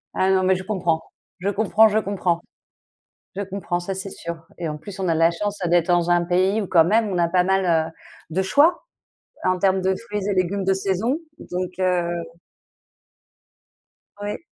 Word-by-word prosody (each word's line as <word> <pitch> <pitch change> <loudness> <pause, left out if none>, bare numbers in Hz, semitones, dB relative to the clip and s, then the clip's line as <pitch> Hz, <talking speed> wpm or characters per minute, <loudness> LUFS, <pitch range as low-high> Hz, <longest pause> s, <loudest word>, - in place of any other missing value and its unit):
Ah 190 +1 +2
non, 190 0 +3
mais 190 0 +3
je 185 - -5
comprends, 175 -5 0 0.4
je 195 +3 -1
comprends, 220 +2 +4
je 215 +1 +2
comprends. 185 -4 -1 0.9
Je 200 - -3
comprends, 185 -2 -3
ça 190 +2 -4
c'est 190 +1 -5
sûr. 170 -2 -7
Et 170 -2 -3
en 150 - -4
plus, 190 +5 -10
on 185 - -1
a 165 - +2
la 165 +1 +4
chance 205 +4 -3
d'être 170 -1 +3
dans 175 0 +2
un 175 0 +4
pays 185 +5 +2
où, 200 - -3
quand 165 -3 +5
même, 220 +4 +2
on 185 -3 -2
a 170 -1 +2
pas 180 0 +2
mal, 180 -4 +2
heu, - - -11 0.4
de 185 +4 0
choix 295 - +3 0.6
en 185 0 +2
termes 190 0 +2
de 190 +1 +2
fruits 210 -3 -5
et 205 - +1
légumes 190 +1 0
de 190 0 +2
saison, 195 - 0 0.2
donc 180 - -4
heu 180 -2 +1 2.1
Oui, 205 0 -3
185 Hz, 190 wpm, -22 LUFS, 175-200 Hz, 2.1 s, quand